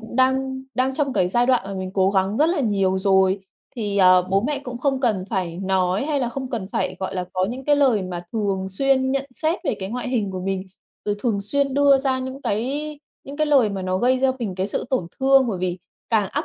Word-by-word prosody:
cũng 225 +1 -9
đang 265 0 +1
đang 260 +2 +1
trong 280 -2 0
cái 180 - +2
giai 240 +6 +2
đoạn 255 -5 +3
mà 195 0 -6
mình 185 -1 -4
cố 190 -1 +3
gắng 195 +1 +1
rất 300 - +4
là 340 -3 0
nhiều 195 -5 +1
rồi, 190 0 +3 0.4
thì, 205 -3 -2
ờ, 185 -1 +6
bố 195 +1 +3
mẹ 295 -2 -1
cũng 245 -1 -6
không 270 0 0
cần 215 -8 +1
phải 180 -6 -2
nói 190 +2 0
hay 295 -3 0
là 245 - 0
không 260 +1 -5
cần 225 -6 -3
phải, - - -1
gọi 190 0 -3
là, 180 -1 -2
có 185 0 +1
những 260 +2 -6
cái 290 +1 +3
lời 260 -8 +3
mà 180 -1 -5
thường 195 -3 -1
xuyên 260 +6 +1
nhận 275 0 0
xét 320 +5 0
về - - 0
cái 190 -1 -5
ngoại 250 +2 -4
hình 225 -6 -1
của 185 -1 -5
mình, 190 0 -2 0.4
rồi 205 - 0
thường 210 -2 0
xuyên 275 +6 -1
đưa 280 -1 +5
ra 265 -1 0
những 260 +2 -6
cái 285 +8 -2 0.3
những 280 +1 -8
cái 305 0 +1
lời 275 -7 +4
mà 195 -2 -4
nó 185 0 -1
gây 255 +4 +2
cho 265 0 +3
mình 215 -7 -3
cái 190 +1 -1
sự 200 - -3
tổn 255 -10 0
thương, 270 0 +5
bởi 195 -5 -2
vì 180 0 -2 0.3
càng 215 -4 +2
áp - - -2
230 Hz, 250 wpm, -22 LUFS, 190-265 Hz, 0.4 s, ờ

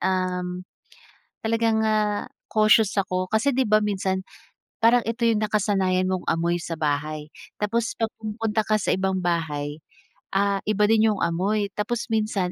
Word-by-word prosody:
um, 180 -1 -1 0.8
talagang, 225 0 +1
ah, 215 -1 +1 0.2
cautious 215 -1 +4
ako, 185 -1 0
kasi 220 +6 +2
'di 260 -2 +1
ba 215 0 +5
minsan 190 -2 -1 0.6
parang 235 +2 +5
ito 230 +1 -3
'yong 230 -2 +3
nakasanayan 195 -3 +1
mong 185 -1 -2
amoy 170 +1 +1
sa 165 0 -5
bahay. 150 0 -2 0.3
Tapos 230 +2 0
'pag 225 -1 -1
pumunta 220 0 -1
ka 215 - +2
sa - - -1
ibang 190 0 0
bahay, 155 -4 -2 0.6
ah, 200 0 +2
iba 210 -1 +2
din 225 0 +4
'yong 205 - -3
amoy. 200 +5 0
Tapos 220 +3 -2
minsan, 215 -5 0
200 Hz, 150 wpm, -24 LUFS, 180-220 Hz, 0.8 s, ba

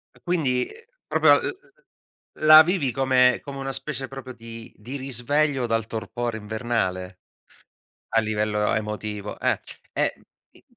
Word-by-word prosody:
E - - -20
quindi 140 -8 0
uhm, 475 +2 -18
proprio - - +4
uhm, - - -2 0.9
la 155 0 +11
vivi 165 -6 0
come 125 0 +3
come 140 -1 -7
una 135 0 -3
specie 135 -1 -4
proprio 135 -1 -8
di 115 -1 -10
di 120 +6 -7
risveglio 135 +1 0
dal 115 -1 0
torpore 115 +1 -4
invernale. 105 -4 -2 1.0
A 115 - +6
livello 105 -1 -1
a 105 - +2
emotivo, 105 -1 -5
ehm, - - +1 0.3
e - - 0 0.4
i - - -22
120 Hz, 140 wpm, -24 LUFS, 110-135 Hz, 1.0 s, la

